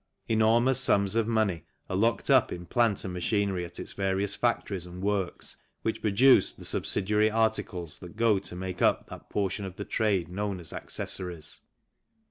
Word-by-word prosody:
Enormous 115 +3 +3
sums 100 -1 +3
of 115 -1 +1
money 110 -8 +1 0.2
are 95 - -3
locked 115 +4 +1
up - - +5
in 90 0 -6
plant 115 +2 +1
and 95 - -4
machinery 95 0 0
at 85 0 -7
its - - -5
various 95 0 0
factories 100 -6 -1
and 90 +1 -8
works 100 -3 -1 0.3
which 110 - -2
produce 120 +6 +5
the - - -10
subsidiary 105 +2 +1
articles 110 -7 -1
that 90 +2 -11
go 110 -3 +3
to 90 - -7
make 90 0 -5
up - - +2
that - - -11
portion 100 0 -1
of 95 -2 -6
the 100 0 -6
trade 105 -6 +1
known 100 +1 -3
as 85 - -6
accessories. 85 -4 -4
100 Hz, 170 wpm, -28 LUFS, 90-110 Hz, 0.3 s, up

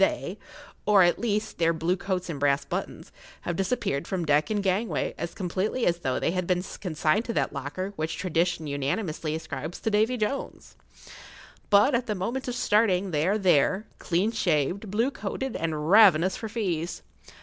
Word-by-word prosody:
they, 190 -1 0 0.5
or 205 -3 +6
at 175 - +3
least 215 -2 -2
their 165 0 +3
blue 165 +3 0
coats 185 -1 -3
and 160 -5 -5
brass 140 0 +2
buttons, - - -5 0.3
have 175 - -3
disappeared 190 - -1
from 185 -4 -2
deck 150 0 +2
and 210 -2 0
gangway 200 +4 0
as 170 - -5
completely 195 +6 -1
as 170 0 +1
though 130 -6 -1
they - - 0
had 185 -1 -2
been 180 -1 +1 0.2
consigned 160 +2 +1
to 235 - -4
that - - 0
locker 150 +8 -4
which 155 0 -2
tradition 170 -2 0
unanimously 150 +3 -2
ascribes 160 0 -6
to 220 - -1
Davy 220 +4 +2
Jones. 230 +5 -4 0.9
But, 205 +7 +5
at 240 +1 +1
the[Pg 210 - -1
11] - - -6
moment 240 +9 -3
of 245 - -2
starting, 205 -5 +2
they 155 +1 +1
are 205 +3 +2
there, 190 +1 +3
clean 185 +6 0
shaved, 180 +1 0
blue 230 +7 +1
coated, 240 +3 -4
and 155 0 -2
ravenous 190 -4 +6
for 220 - -6
fees. 180 -7 -3
185 Hz, 180 wpm, -27 LUFS, 160-210 Hz, 0.9 s, or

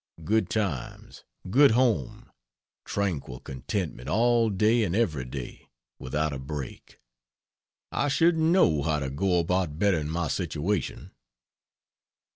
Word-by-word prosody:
Good 110 +7 +1
times, 95 - -4 0.2
good 140 +9 +6
home, 115 - 0 0.5
tranquil 85 -11 -3
contentment 65 -1 -4
all 115 0 +3
day 110 +4 +2
and 90 -3 -1
every 80 - 0
day, 60 -1 -8 0.3
without 75 +4 -2
a 70 - -5
break. 70 -1 -7 0.9
I - - 0
shouldn't 160 +3 +3
know 160 - +4
how 75 +1 0
to 70 -2 -3
go 90 +6 +1
about 85 -2 0
bettering 80 -6 +1
my 85 +1 -1
situation." 85 +5 -2
85 Hz, 115 wpm, -27 LUFS, 75-110 Hz, 0.9 s, good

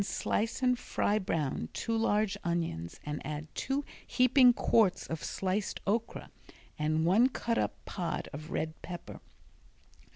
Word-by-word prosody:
Slice 225 +4 -1
and 250 -1 +3
fry 210 -3 0
brown 150 - -2
two 230 - -2
large 210 -2 +2
onions 165 - -2
and 150 0 -4
add 150 +2 -6
two 275 +2 -1 0.2
heaping 255 0 +6
quarts 220 -5 +3
of 160 -1 -5
sliced 190 +2 -2
okra 225 +3 -2 0.5
and 155 +1 +1
one 215 +9 +5
cut 235 -2 -1
up - - 0
pod 175 -4 -3
of 155 +3 -7
red 160 -1 -3
pepper. 175 -1 -8
190 Hz, 135 wpm, -31 LUFS, 155-230 Hz, 0.5 s, heaping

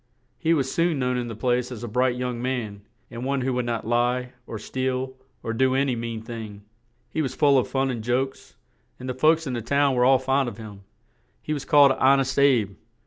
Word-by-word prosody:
He 165 +1 +2
was 135 -3 -1
soon 170 -2 +1
known 125 -1 0
in 120 -1 -2
the 115 - -6
place 125 +2 0
as 120 -2 -7
a - - -4
bright 125 +2 +1
young 125 -1 -3
man, 120 -6 -3 0.3
and 120 +1 -6
one 135 0 -1
who 130 +1 -1
would 125 -1 -1
not 115 -2 -2
lie, 125 +2 0
or 110 - -5
steal, 130 +3 -3 0.3
or 115 - -3
do 130 +2 +2
an 140 +1 +2
y - - +1
mean 115 -1 -4
thing; 110 -3 -8 0.5
he 160 - -1
was 130 -4 -3
full 140 -1 +4
of 130 - +3
fun 135 0 0
and 115 -3 -5
jokes, 130 +3 -2 0.4
and 130 - -7
the 130 - -2
folks 155 +5 +3
in 130 - -3
the 120 - -2
town 140 +4 +2
were 125 -1 +2
all 130 +1 +6
fond 135 0 0
of 105 - -11
him; 105 -3 -10 0.6
he 155 - -4
was 140 -3 -4
called 145 -2 +6
"Hon 135 +1 +4
est 135 0 -1
Abe." 120 -8 +3
125 Hz, 230 wpm, -24 LUFS, 120-135 Hz, 0.6 s, all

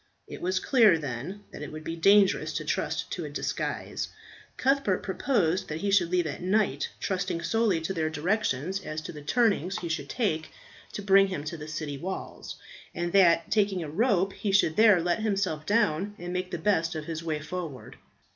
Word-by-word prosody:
It - - -9
was 185 +1 0
clear, 220 -9 +5
then, 150 +8 -6
that - - -9
it 150 - -6
would 155 0 -8
be 165 - -4
dangerous 195 +3 +4
to - - -3
trust - - -2
to - - -3
a - - -5
disguise. - - -3 0.5
Cuthbert 265 -8 +1
proposed 190 -4 0
that 155 +1 -5
he 200 - 0
should 185 -4 +4
leave 180 -1 +1
at 155 - -5
night, 185 -7 +1
trusting 180 -3 -2
solely 205 0 +2
to 160 +4 -2
their 160 -3 -1
directions 175 - -1
as 155 -3 -5
to - - -7
the 150 -3 -9
turnings 200 +1 +1
he 170 - -5
should 150 -4 -3
take 160 -10 -1 0.4
to 205 - -5
bring 195 0 +6
him 185 -7 -4
to 155 +3 -5
the 150 -1 -8
city 155 -2 -5
walls, 190 +5 -6 0.4
and 175 0 -2
that, 170 -4 +4
taking 200 -4 +2
a 155 - -6
rope, 195 0 +2
he 205 - -2
should 195 -5 +3
there 215 -4 +6
let 175 +2 0
himself 195 -8 -1
down, 205 -2 +1
and 175 0 -6
make 180 0 -2
the 175 - -3
best 165 -2 +1
of 155 -1 -4
his 165 0 -5
way 155 -2 -2
forward. 155 -3 -7
180 Hz, 195 wpm, -28 LUFS, 160-200 Hz, 0.5 s, bring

